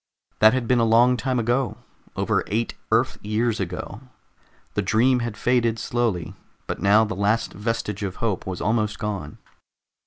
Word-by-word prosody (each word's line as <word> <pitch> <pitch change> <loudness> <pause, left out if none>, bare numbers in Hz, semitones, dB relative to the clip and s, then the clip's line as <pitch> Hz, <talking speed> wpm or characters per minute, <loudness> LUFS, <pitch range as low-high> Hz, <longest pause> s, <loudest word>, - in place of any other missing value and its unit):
That 110 +1 +7
had 125 -3 -2
been 125 0 +3
a - - +3
long 120 +3 +5
time 130 +1 -1
ago, 120 +3 0 0.4
over - - 0
eight 115 +3 -1 0.2
Earth - - +2
years 110 +2 0
ago; 95 +3 -5 0.7
the 105 - 0
dream 115 +6 +3
had 115 -3 -4
faded 120 -2 +1
slowly, 115 -7 -1 0.3
but - - -5
now 105 +3 +5
the 110 - -4
last 105 +4 0
vestige 105 -1 -3
of 95 -2 -3
hope 110 -6 -2
was 95 -2 -4
almost 105 0 0
gone. 100 -9 -4
110 Hz, 160 wpm, -23 LUFS, 105-120 Hz, 0.7 s, That